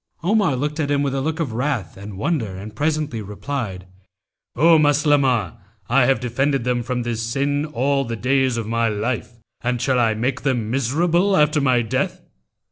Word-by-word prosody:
Omar 195 -5 +2
looked 150 +4 -3
at 145 -2 0
him 145 0 +1
with 140 -2 -1
a 135 - -1
look 160 +4 -2
of 140 -9 -2
wrath 125 - -2
and 100 0 -9
wonder 110 - -1
and 105 +3 -9
presently 150 -3 -1
replied, 105 -2 -5 0.7
'O 165 +4 +5
Maslamah, 145 - +2 0.3
I 125 0 +4
have 135 - +3
defended 135 +2 0
them 125 0 0
from 125 +1 -2
this 115 -1 -3
sin 140 +5 -1
all 140 0 0
the 115 -2 -4
days 130 +1 +1
of 115 - -2
my 115 +1 0
life, 115 +3 -3 0.3
and 125 0 0
shall 130 +1 +1
I 115 -2 +2
make 125 +5 -1
them 120 -6 -1
miserable 170 - +2
after 150 0 +3
my 130 -3 +3
death? 110 - -2
130 Hz, 180 wpm, -21 LUFS, 115-145 Hz, 0.7 s, O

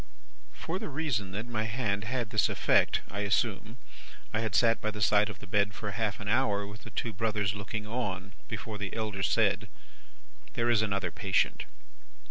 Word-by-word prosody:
"For 175 +4 -4
the - - -4
reason 135 -10 -1
that 105 +3 -3
my 110 -3 -2
hand 110 -3 -1
had 120 -1 -2
this 105 -4 +3
effect - - +3
(I 100 - -3
assume), 105 +2 0 0.6
I 110 - +1
had 110 -2 -1
sat 115 -1 +4
by 110 - 0
the 105 -1 -6
side 105 +1 +4
of 105 - -7
the 105 - -11
bed 105 +1 +1
for 105 -2 -4
half 110 -1 -1
an 100 - -6
hour, 105 -3 +2
with 105 +2 -10
the - - -10
two 110 +2 -3
brothers 105 -1 0
looking 105 +1 -4
on, 105 -4 -3
before 110 -1 -5
the 100 -2 -4
elder 105 -3 -2
said: 105 0 +2 0.8
"'There 120 0 +2
is 110 -3 +4
another 100 -4 0
patient. 95 -4 +1
105 Hz, 185 wpm, -30 LUFS, 100-115 Hz, 0.8 s, sat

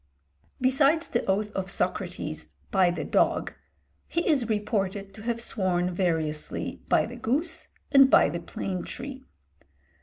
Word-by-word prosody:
Besides 275 +5 +3
the 235 - 0
oath 205 +2 +1
of 190 -2 -3
Socrates, 180 -4 -3 0.2
"by 190 -3 +4
the 175 - -2
dog," - - +1 0.5
he 340 - -1
is 270 -8 +2
reported 205 -2 -1
to 215 - -11
have 235 +1 -2
sworn 180 -6 0
variously 160 -4 -1
by - - +4
the - - -8
goose 315 +8 -1 0.2
and 275 -1 +8
by - - +6
the 170 - -3
plane 180 +1 -4
tree. 265 +1 -7
205 Hz, 140 wpm, -27 LUFS, 180-260 Hz, 0.5 s, and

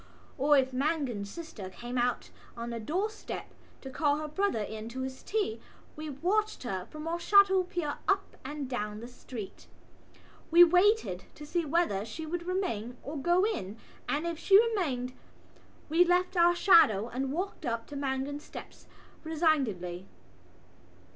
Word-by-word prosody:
Or 290 +2 +4
if 260 -1 +1
Mangan's 255 -7 -1
sister 245 - -8
came 240 +6 -7
out 245 0 0 0.3
on 235 +1 -4
the 230 - -4
doorstep 385 - -4 0.3
to 265 - -8
call 290 +1 +1
her 305 0 -4
brother 305 - 0
in 220 +1 -6
to 260 +2 -5
his 260 0 -5
tea 395 - -2 0.3
we 310 0 -6
watched 375 +10 0
her 190 -6 -4
from 305 +1 -7
our 340 +1 -1
shadow 385 +1 +5
peer 350 -5 -3
up 390 0 +1
and 285 +1 -5
down 210 -4 -3
the 235 - -8
street. 245 -4 -9 0.8
We 340 +2 +9
waited 360 - +3
to 300 - -9
see 335 +2 -1
whether 290 - +1
she 230 +9 -6
would 345 +2 -4
remain 250 - -2
or 290 - -6
go 345 +6 +2
in 225 - -3 0.3
and, 300 +3 0
if 335 -2 -3
she 390 +3 +6
remained, 315 - 0 0.7
we 330 +3 +5
left 360 +1 +1
our 345 0 +5
shadow 230 - +5
and 260 +2 -3
walked 365 +7 -3
up 230 -1 -2
to 290 - -10
Mangan's 275 +1 -2
steps - - -11 0.4
resignedly. 255 - 0
295 Hz, 155 wpm, -30 LUFS, 240-350 Hz, 0.8 s, We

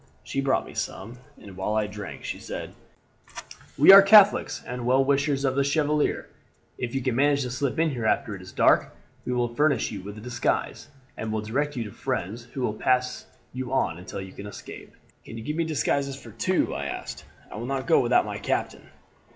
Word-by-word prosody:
She 135 - -2
brought 135 -1 +1
me - - -11
some, 110 +7 -5 0.2
and 100 -2 -12
while 95 +3 -2
I 110 -1 +1
drank 105 -3 -8
she - - -5
said: - - -7 1.0
"'We 150 - +9
are 195 - +12
Catholics 205 +1 +5
and 125 0 -5
well 130 +2 +4
wishers 140 0 +1
of 130 - +1
the 140 - +2
Chevalier; 150 +1 0 0.5
if 125 0 -4
you 135 - -1
can 130 -2 0
manage 140 +1 +3
to 125 - -4
slip 130 +1 -2
in 165 -1 +2
here 120 -5 -2
after 105 - 0
it 95 - -10
is 90 - -11
dark - - +3 0.3
we - - -2
will 120 -1 -1
furnish 145 +2 +1
you 100 - -6
with 100 +2 -9
a - - -9
disguise, 120 +4 -2 0.3
and 110 0 -4
will 110 0 -1
direct 140 +7 -2
you 120 - -2
to 105 - -8
friends 115 -2 -4
who 130 +2 -7
will 110 - 0
pass 125 +3 0 0.3
you 130 0 -5
on 85 -10 0
until 90 - -7
you 95 -1 -9
can 100 - -8
escape. 105 - -10 0.3
"'Can 115 - -9
you 115 - -7
give 150 +5 -3
me 165 0 0
disguises 140 -2 -1
for - - -12
two?' 185 0 0
I 70 - -4
asked. - - -6 0.3
'I - - -7
will 120 +3 -5
not 135 -1 -2
go 165 - +4
without 120 0 +3
my - - -5
captain.' - - -3
125 Hz, 215 wpm, -26 LUFS, 110-140 Hz, 1.0 s, are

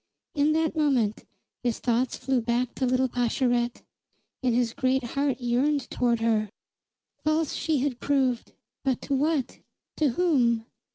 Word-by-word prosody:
In 300 0 +2
that 320 0 +1
moment 260 -9 +1 0.4
his 240 -2 0
thoughts 245 +1 0
flew 260 -1 0
back 240 +2 0
to 260 - -1
little 255 +1 +2
Pascherette, 245 0 0 0.6
and 250 -3 +1
his 240 -2 +1
great 260 +1 +1
heart 275 +1 -1
yearned 260 +3 0
toward 235 -2 +1
her. 220 -2 +1 0.7
False 310 0 +1
she 310 -5 0
had 265 -3 -1
proved, 265 -4 0 0.3
but 265 -3 +1
to 280 - -2
what? 290 0 0 0.4
To 305 -3 +3
whom? 245 -7 +2
255 Hz, 145 wpm, -26 LUFS, 240-285 Hz, 0.7 s, To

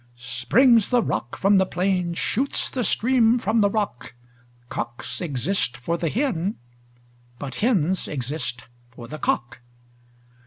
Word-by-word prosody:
Springs 150 - +3
the 245 -2 +3
rock 120 - -3
from 195 0 +4
the 190 - +3
plain, 180 -1 0
shoots 265 +10 0
the 255 - -1
stream 235 +2 +3
from 220 0 +1
the 200 - +4
rock: 200 - -3 0.5
Cocks 120 +6 -5
exist 145 -3 -1
for 165 +7 -2
the 170 -1 -1
hen: 205 - -1 0.8
but 130 -1 -6
hens 190 -6 +1
exist 130 -2 -4 0.3
for 120 -1 -11
the 155 +5 -7
cock. 120 0 -1
180 Hz, 130 wpm, -24 LUFS, -, 0.8 s, from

